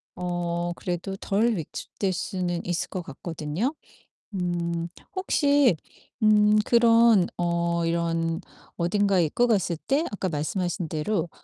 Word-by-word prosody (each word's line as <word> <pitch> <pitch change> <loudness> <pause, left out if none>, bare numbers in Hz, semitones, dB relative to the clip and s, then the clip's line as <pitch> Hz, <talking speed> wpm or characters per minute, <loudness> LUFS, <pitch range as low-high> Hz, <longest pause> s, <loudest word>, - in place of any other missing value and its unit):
어 175 -1 -2
그래도 180 +2 -4
덜 215 +4 +1
위축될 190 +3 -4
수는 180 -1 -2
있을 175 -1 -2
것 185 - -4
같거든요? 165 - -3 0.6
음 170 -2 -1 0.3
혹시 285 - +3 0.5
음 210 -1 +5
그런 230 -4 +5
어 170 -1 0
이런 165 -1 0 0.4
어딘가에 190 0 +2
입고 240 +11 +1
갔을 195 -6 +1
때 280 +4 +2
아까 190 -2 -2
말씀하신 175 +3 -2
대로 165 +3 -1
175 Hz, 225 characters per minute, -26 LUFS, 170-210 Hz, 0.6 s, 음